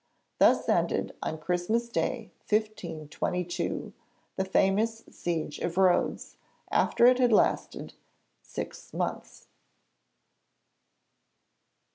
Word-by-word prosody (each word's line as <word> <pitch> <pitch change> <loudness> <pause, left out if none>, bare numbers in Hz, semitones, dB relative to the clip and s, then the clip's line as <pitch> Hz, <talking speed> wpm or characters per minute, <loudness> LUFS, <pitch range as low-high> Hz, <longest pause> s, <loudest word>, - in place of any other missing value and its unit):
Thus - - +4
ended - - +1
on 160 - -3
Christmas 180 +9 -1
Day 235 -1 -2 0.2
1522 180 -4 -2 0.4
the 190 - 0
famous 210 +4 +1
Siege 165 -3 -3
of 170 +1 -3
Rhodes, 185 -2 +2 0.3
after 235 - +3
it 250 +1 +6
had 245 -2 +4
lasted 215 - +1 0.5
six - - -8
months. - - -4
190 Hz, 85 wpm, -28 LUFS, 175-225 Hz, 0.5 s, it